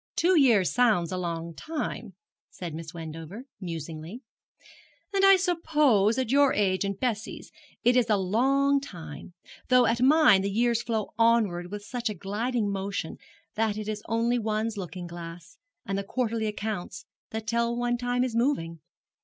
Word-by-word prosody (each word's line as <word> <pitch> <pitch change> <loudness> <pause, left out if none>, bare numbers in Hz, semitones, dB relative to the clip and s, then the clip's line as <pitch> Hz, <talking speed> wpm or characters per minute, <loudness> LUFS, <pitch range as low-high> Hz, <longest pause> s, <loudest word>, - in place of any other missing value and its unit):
'Two 365 +2 +3
years 235 - +4
sounds 220 -9 +3
a - - -2
long 170 -2 -4
time,' 235 - -5 0.3
said 175 -3 -7
Miss 160 0 -7
Wendover, 165 +5 -8 0.2
musingly, 165 - -7 0.9
'and 390 0 +2
I 390 0 +8
suppose, 300 - +2
at 255 -3 -1
your 280 0 +4
age 190 -2 +1
and 200 -1 -3
Bessie's, 235 -2 -3 0.3
it 245 +1 +4
is 245 -3 +3
a 210 - +4
long 270 +9 +2
time; 165 - -9 0.3
though 250 -1 +5
at 235 +1 +1
mine 265 -7 +6
the 200 - -1
years 235 +3 +1
flow 220 -4 -2
onward 215 -7 +2
with 205 +1 -7
such 245 0 -3
a 210 - -4
gliding 210 +4 -2
motion 195 -3 -4 0.4
that 220 -1 0
it 215 -1 -5
is 215 -1 -3
only 230 +2 +1
one's 220 0 -1
looking 180 -2 -6
glass, 170 +2 -10 0.3
and 195 0 -2
the - - -3
quarterly 225 0 -1
accounts, 210 -5 -5 0.2
that 220 0 -5
tell 235 +1 0
one 240 0 0
time 245 +1 0
is 250 -3 -2
moving. 200 - 0
215 Hz, 160 wpm, -27 LUFS, 185-245 Hz, 0.9 s, I